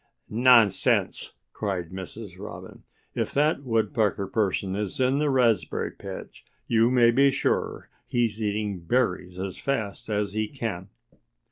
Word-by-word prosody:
"Nonsense!" 115 -4 +4 0.2
cried 95 -5 -3
Mrs. 95 +1 -8
Robin. 95 -2 -9 0.3
"If - - -3
that 150 +1 +2
Woodpecker 110 -5 0
person 95 -2 -1
is 105 +1 -3
in 130 +2 +2
the 150 -1 +1
raspberry 115 -9 +1
patch - - -9 0.2
you 115 0 +3
may 120 -2 +5
be 140 +3 +5
sure 135 - -1 0.2
he's 115 -3 0
eating 105 -2 -1
berries 90 -2 -1
as 95 -1 -5
fast 110 -8 -3
as 105 -1 -1
he 110 0 -1
can." 105 -7 -5
110 Hz, 130 wpm, -26 LUFS, 95-120 Hz, 0.3 s, may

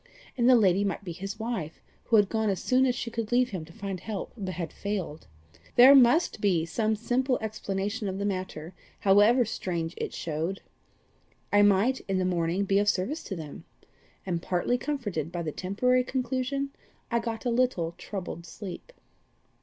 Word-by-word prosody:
And 240 0 +3
the 255 - +8
lady 200 -3 +4
might 200 0 -2
be 180 - -5
his 195 +5 -6
wife, 220 -9 -4 0.3
who 230 - +2
had 205 -2 +5
gone 220 0 0
as 195 - -1
soon 260 +1 +3
as 250 - +1
she 240 -1 -4
could 230 -1 -4
leave 250 0 +3
him 185 -5 -4
to 165 - -15
find 195 +1 -5
help, 205 +1 -5
but 190 -5 -5
had 170 -4 -5
failed. 190 -7 -4 0.5
There 255 +3 +9
MUST 255 -1 +5
be 180 -6 +2
some 220 +5 0
simple 250 +4 0
explanation 210 0 -3
of 190 0 -3
the 200 - -2
matter, 185 -4 -4 0.3
however 210 +5 +5
strange 175 -6 -3
it - - -3
showed! 165 +4 -3 0.9
I 205 - +6
might, 205 +6 +4
in 195 -1 0
the 185 - +1
morning, 175 +2 0
be 195 0 +3
of 205 0 +3
service 240 - -1
to 195 - -4
them. 155 -4 -8 0.6
And 175 -3 -2
partly 185 +8 0
comforted 205 - -3
by 175 -1 -3
the 155 - -3
temporary 250 +10 +1
conclusion, 260 +2 -2 0.4
I 235 - +2
got 230 0 -5
a 245 - +1
little 235 -9 +1
troubled 175 -4 -6
sleep. 200 - -8
205 Hz, 180 wpm, -28 LUFS, 185-240 Hz, 0.9 s, There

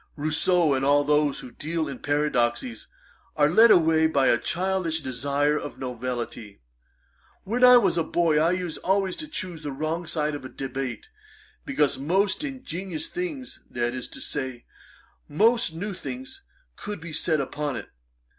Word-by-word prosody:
Rousseau, 155 +1 +2
and 135 0 0
all 145 +1 +4
those 150 -1 +2
who 125 - -10
deal 160 +3 -3
in 135 -3 -6
paradoxes, 125 -6 0 0.5
are 150 0 +3
led 225 +6 +7
away 160 -4 +5
by 140 -4 +3
a 120 - +3
childish 180 +2 -1
desire 145 +3 0
of 145 - -7
novelty. 120 - -5 0.8
When 240 +5 -1
I 250 0 +10
was 185 -7 +2
a - - +2
boy, 160 -1 +2
I 160 +2 +3
used 180 -3 -3
always 190 0 +1
to 310 - -6
choose 185 - -5
the 145 -2 -4
wrong 155 +4 -3
side 155 -2 -1
of 145 - -6
a 130 - -7
debate, 130 -3 -5 0.6
because 140 -1 +1
most 190 - +1
ingenious 190 - -5
things, 325 -7 -5
that 120 0 -1
is 130 -1 -5
to - - -10
say, 130 -4 -5 0.6
most 220 +2 +2
new 200 +5 -4
things, 260 - -8 0.3
could 210 -2 -6
be 165 0 -8
said 155 0 +1
upon 145 +1 -3
it. - - -7
155 Hz, 160 wpm, -25 LUFS, 135-185 Hz, 0.8 s, I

